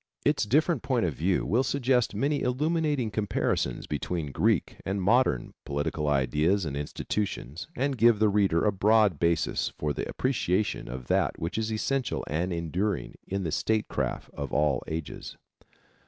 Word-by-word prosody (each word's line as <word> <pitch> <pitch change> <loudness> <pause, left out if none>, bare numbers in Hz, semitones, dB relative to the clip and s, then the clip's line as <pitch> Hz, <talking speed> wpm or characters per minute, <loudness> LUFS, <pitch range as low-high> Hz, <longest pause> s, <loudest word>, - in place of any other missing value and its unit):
Its 145 -5 +2
different 150 - +2
point 125 -6 +1
of 80 - -1
view 90 +6 0
will 115 +6 +2
suggest 130 -4 +1
many 140 +7 0
illuminating 145 -2 0
comparisons 105 0 -1
between 75 +1 -3
Greek - - +1
and 100 +1 -2
modern 105 - +2
political 75 +1 -2
ideals 75 +7 +2
and 70 -3 -3
institutions 75 - -3
and 135 -1 -1
give 115 0 +6
the 110 +1 +4
reader 100 -4 +2
a 105 - +4
broad 105 -3 +3
basis 85 -2 +1
for 75 -1 -3
the - - -4
appreciation 105 -6 0
of 65 0 -6
that - - +1
which 85 - -4
is 110 0 -1
essential 130 +4 -1
and 85 +5 -1
enduring 85 +5 -2
in 100 0 -2
the 80 - -2
statecraft 110 +5 -1
of 70 -3 -5
all 75 -3 +1
ages. 80 -1 -5
100 Hz, 155 wpm, -28 LUFS, 80-120 Hz, -, give